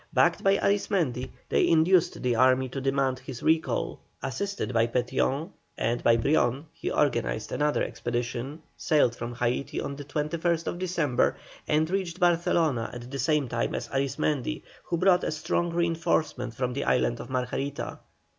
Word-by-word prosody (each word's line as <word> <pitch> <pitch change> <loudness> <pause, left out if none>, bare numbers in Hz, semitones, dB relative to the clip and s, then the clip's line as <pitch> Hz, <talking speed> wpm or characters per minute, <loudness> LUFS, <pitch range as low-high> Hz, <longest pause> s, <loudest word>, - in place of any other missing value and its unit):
Backed - - +3
by 195 0 +4
Arismendi 175 - 0 0.2
they - - +3
induced 175 +2 +3
the 125 -2 +2
army 130 +2 +4
to 135 +2 -5
demand 135 -1 +1
his 130 -2 -8
recall. 160 0 +1 0.2
Assisted 200 +1 -3
by 115 0 +3
Petión 130 +7 0 0.3
and 120 +1 0
by 115 0 +5
Brion 135 +2 +1
he - - -4
organized - - 0
another 150 0 +1
expedition, 120 +5 -3
sailed 145 -6 +2
from 120 0 -5
Haití 125 +3 -1
on 140 - -4
the 145 - -7
21st 165 +4 -1
December, 170 -8 +1 0.3
and 155 +1 +2
reached 185 -2 -2
Barcelona 165 -7 +2
at 120 +1 -9
the 140 - -4
same 150 +1 +2
time - - -1
as - - -4
Arismendi, 140 +2 -1 0.2
who 170 - -1
brought 180 0 +4
a - - 0
strong 165 +3 -1
reinforcement 165 -7 0
from 125 0 -1
the 140 - -2
island - - +1
of - - -8
Margarita. 130 +2 -3
140 Hz, 155 wpm, -27 LUFS, 125-165 Hz, 0.3 s, by